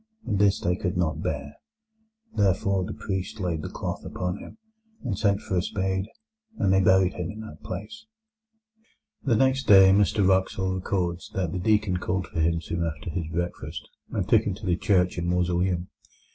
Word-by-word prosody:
And 100 -4 0
this 100 -1 +4
they 90 +1 +1
could 90 -1 -2
not 80 -4 0
bear. 75 - -4 0.8
Therefore 100 -1 +2
the - - -5
priest 95 0 -4
laid 85 -5 -1
the - - -5
cloth - - -4
upon 90 +1 -3
him, - - -11 0.5
and 120 -7 -1
sent 100 +1 +1
for 95 - -3
a - - +3
spade, 95 0 -1 0.5
and 95 - +2
they 95 - +5
buried 95 0 +4
him - - -4
in 110 0 -7
that 80 -8 -10
place." 105 - -7 1.2
The 120 -4 +2
next 130 +3 +2
day 95 -1 +8
Mr 100 0 +3
Wraxall 95 0 +1
records 90 -2 -2
that 90 -4 -1
the 90 - -2
deacon 105 -1 +2
called 90 +1 -2
for 80 - -6
him 85 +1 +2
soon 85 +2 -3
after 80 0 -4
his 85 -2 -3
breakfast, 85 +1 -4 0.2
and 95 -3 -2
took 110 0 +5
him 105 -4 -2
to 100 - -9
the 90 -2 +2
church 90 -3 +2
and 85 - -2
mausoleum. 90 0 +1
95 Hz, 185 wpm, -26 LUFS, 90-100 Hz, 1.2 s, day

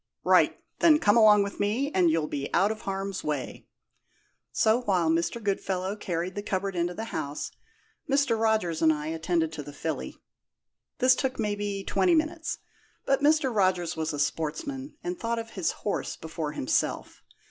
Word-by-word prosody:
"Right! - - +4 0.2
Then 315 -3 +6
come 205 -8 +3
along 210 -3 +7
with 200 - -6
me, 235 +8 0
and 180 -2 +4
you'll 160 -1 +1
be 140 -2 -4
out 195 +4 +4
of 220 - -6
harm's 195 0 -4
way." 150 -4 -4 0.8
So, 220 +3 +3
while 180 -8 +2
Mr. 170 +6 0
Goodfellow 195 -1 -1
carried 180 -2 -3
the 205 - -4
cupboard 195 -1 -2
into 175 0 -1
the 220 - -4
house, 145 -2 -4 0.6
Mr. 275 -4 +3
Rogers 215 -8 +1
and 160 -1 +6
I 150 0 -3
attended 165 0 0
to 160 - -6
the 145 0 -9
filly. 160 +2 -4 0.8
This 255 0 +5
took, 260 -1 -2
maybe, 205 -2 -2
twenty 355 - +2
minutes; 320 +1 -1 0.5
but 275 0 +2
Mr. 290 -4 +3
Rogers 180 -4 +1
was 160 0 -2
a 145 - -4
sportsman, 265 - -3
and 355 +1 -4
thought 230 0 -1
of 225 0 -5
his 185 -6 -1
horse 205 - -2
before 160 -2 -5
himself. 130 - -1
195 Hz, 170 wpm, -27 LUFS, 165-230 Hz, 0.8 s, along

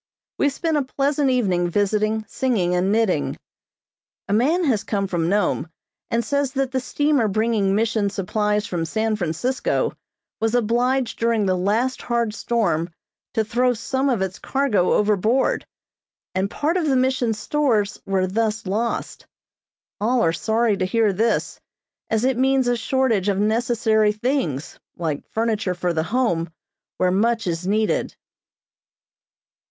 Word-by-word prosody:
We 285 - +3
spent 315 +2 -1
a - - +2
pleasant 280 +1 0
evening 185 -9 +1
visiting, 215 +3 0
singing 210 -9 0
and 180 +2 +1
knitting. 220 -3 +1 0.9
A 200 - -1
man 295 - +2
has 240 -10 +1
come 200 -2 -1
from 175 -3 -1
Nome, 200 -5 0 0.4
and 230 -1 0
says 280 +1 0
that 270 -1 -1
the 260 - 0
steamer 285 -2 +1
bringing 210 -1 +1
Mission 220 -1 +1
supplies 210 +2 -1
from 170 -2 -2
San 220 +6 -1
Francisco 210 +8 -1 0.5
was 225 +1 +1
obliged 245 +2 +1
during 230 -2 +1
the 185 -1 +2
last 215 +8 0
hard 235 -3 -1
storm 195 -8 0 0.5
to 220 - +2
throw 245 +3 +1
some 265 +4 -1
of 230 -7 +1
its 190 +1 -5
cargo 265 -10 +1
overboard, 215 +5 +1 0.7
and 190 +1 0
part 310 - 0
of 335 -4 0
the 270 - +2
Mission's 255 -3 +1
stores 220 -5 0
were 190 -1 0
thus 220 +3 -1
lost. 220 +5 -3 0.7
All 235 +4 +2
are 165 - +2
sorry 220 +4 +1
to 185 - 0
hear 215 +1 +2
this, 225 +4 0 0.5
as 220 +2 +1
it 260 -2 +1
means 265 -1 +3
a 245 - +2
shortage 230 -5 +1
of 195 - 0
necessary 220 0 +2
things, 215 - -2 0.2
like 155 -4 -3
furniture 220 -4 -1
for 175 0 -1
the 160 - 0
Home, 175 -5 0 0.5
where 185 0 +2
much 225 +4 +1
is 170 +1 -2
needed. 215 +2 0
220 Hz, 145 wpm, -22 LUFS, 195-250 Hz, 0.9 s, We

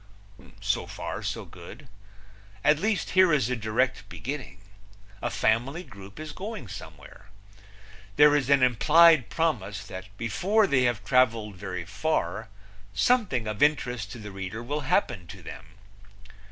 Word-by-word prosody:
So - - -1
far - - -5
so - - -4
good. - - -12 0.8
At 150 +1 +4
least, 210 -1 -1
here 185 -2 +5
is 130 -6 +2
a - - +1
direct 110 -1 -1
beginning. 125 -8 -6 0.6
A - - -1
family 125 +10 0
group 100 - -13
is 155 -1 -6
going 205 - -7
somewhere. 95 - -11 0.9
There 150 0 +6
is 140 -3 0
an 140 -2 +5
implied 150 +3 +5
promise 105 - -1
that 95 0 -8
before 185 - +2
they 130 -8 +2
have 120 -3 0
traveled 115 -5 +2
very 90 -2 -5
far 110 - -2 0.5
something 210 - +2
of 105 -1 -4
interest 125 -8 +1
to - - -8
the 105 -2 -8
reader 95 +3 -6
will 145 +5 -3
happen 120 -8 0
to - - -11
them. - - -10
125 Hz, 140 wpm, -27 LUFS, 105-150 Hz, 0.9 s, There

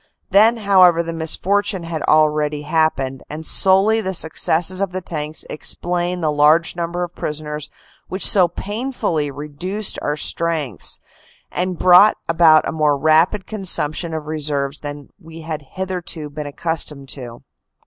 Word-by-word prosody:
Then, 220 +5 +5
however, 185 -5 +4
the 165 0 -5
misfortune 190 +4 -1
had 165 -2 -5
already 150 -1 +2
happened, 145 -4 -1
and 155 +2 -7
solely 195 +6 +4
the 190 -2 -3
successes 170 +3 +2
of 195 -2 -2
the 185 - -2
tanks 155 -3 -5
explain 175 +3 -2
the 155 -2 0
large 150 +4 +3
numbers 175 +1 -3
of - - -42
prisoners 150 0 -5 0.4
which 190 +1 0
so 185 -3 +6
painfully 205 - -3
reduced 160 +9 -3
our 150 +1 -2
strengths, 155 - -2 0.5
and 180 0 -2
brought 185 +5 +6
about 165 -2 +4
a - - -2
more 150 -2 +1
rapid 160 +7 +2
consumption 175 -5 -3
of 160 -1 -5
reserves 145 -2 -2
than 145 -1 -8
we 165 -2 -12
had 160 -1 -5
hitherto 180 -5 -5
been 150 0 -6
accustomed 150 -2 -3
to. 120 -4 -6
165 Hz, 140 wpm, -19 LUFS, 150-185 Hz, 0.5 s, so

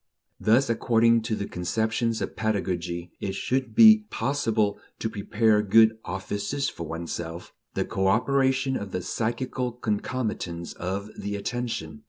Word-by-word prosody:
Thus, 120 +5 +4
according 115 0 +3
to 110 - +1
the 100 - -3
conceptions 110 +6 -1
of - - -5
pedagogy, 90 -5 -2
it 95 -1 -3
should 125 +2 -1
be 220 -1 +8
possible 115 -5 0 0.2
to 110 - -3
"prepare 105 +1 +2
good 110 +2 +5
offices 100 +9 -2
for 85 - -7
oneself," 85 +1 -6 0.2
the - - 0
cooperation 130 +6 +2
of 100 -5 -5
the 90 - -2
psychical 125 +4 -2
concomitants 105 -6 -3
of 100 +4 -4
the 100 0 -4
attention. 100 -8 -4
110 Hz, 130 wpm, -26 LUFS, 95-120 Hz, 0.2 s, be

